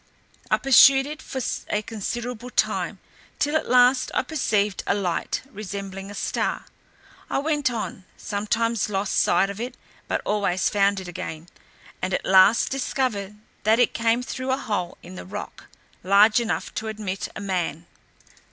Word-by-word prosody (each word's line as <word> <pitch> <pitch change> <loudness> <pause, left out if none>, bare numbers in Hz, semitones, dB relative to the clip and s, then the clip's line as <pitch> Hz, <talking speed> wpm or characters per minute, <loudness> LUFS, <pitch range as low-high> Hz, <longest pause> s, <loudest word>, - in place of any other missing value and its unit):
I - - +4
pursued 270 0 +7
it 305 +2 -7
for 265 - -5 0.3
a 210 0 0
considerable 235 +2 -5
time, - - 0 0.4
till 295 +1 0
at 315 - 0
last 250 +1 +5
I - - +2
perceived 210 - 0
a - - +2
light, 185 -4 -2
resembling 195 -2 -6
a 205 - -8
star; - - -2 0.6
I - - 0
went 295 -1 +1
on, 220 -5 -5
sometimes 220 +2 -1
lost 195 -1 -1
sight 195 - +3
of 200 +3 -7
it, 245 +1 -5 0.3
but - - -1
always 200 -3 +1
found 200 -1 +2
it 190 - -8
again, 165 -1 -7 0.5
and 185 0 0
at - - -3
last 190 +4 +5
discovered 245 -7 -2 0.3
that 220 +2 +3
it 245 - +3
came 230 +1 +1
through 260 +1 -5
a 260 - +2
hole 200 -9 -3
in 180 - -10
the 185 - -8
rock, 205 +3 -8 0.4
large 205 +4 +5
enough 230 -2 -2
to 220 - -4
admit 210 -3 -4
a - - -5
man. 175 -5 -2
210 Hz, 160 wpm, -24 LUFS, 195-245 Hz, 0.6 s, pursued